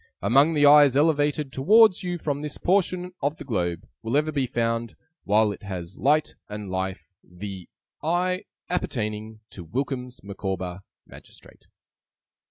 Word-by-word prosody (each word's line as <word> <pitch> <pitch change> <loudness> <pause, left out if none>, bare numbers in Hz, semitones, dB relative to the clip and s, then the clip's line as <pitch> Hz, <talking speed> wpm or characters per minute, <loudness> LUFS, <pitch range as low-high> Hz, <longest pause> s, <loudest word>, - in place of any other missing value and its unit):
'Among 140 - +4
the 145 -1 +4
eyes 145 -2 +7
elevated 145 -2 +2
towards 210 +9 +5
you 180 -1 -3
from 145 -3 -3
this 150 -1 -5
portion 180 -1 0
of 145 +3 -1
the - - -8
globe, 90 - -2
will 115 +5 0
ever 155 +1 +1
be 140 -4 0
found, 115 -1 -1 0.3
while 105 +1 +3
it 100 - -8
has 95 -2 -6
light 150 +4 +2 0.2
and 105 -2 -6
life, 95 0 -3 0.2
'The 95 0 -9 0.3
'Eye 180 +4 0 0.2
'Appertaining 110 -9 -3
to 90 - -9
'WILKINS 125 - -4
MICAWBER, 95 -2 -4 0.2
'Magistrate. - - -15
130 Hz, 140 wpm, -25 LUFS, 100-150 Hz, 0.3 s, eyes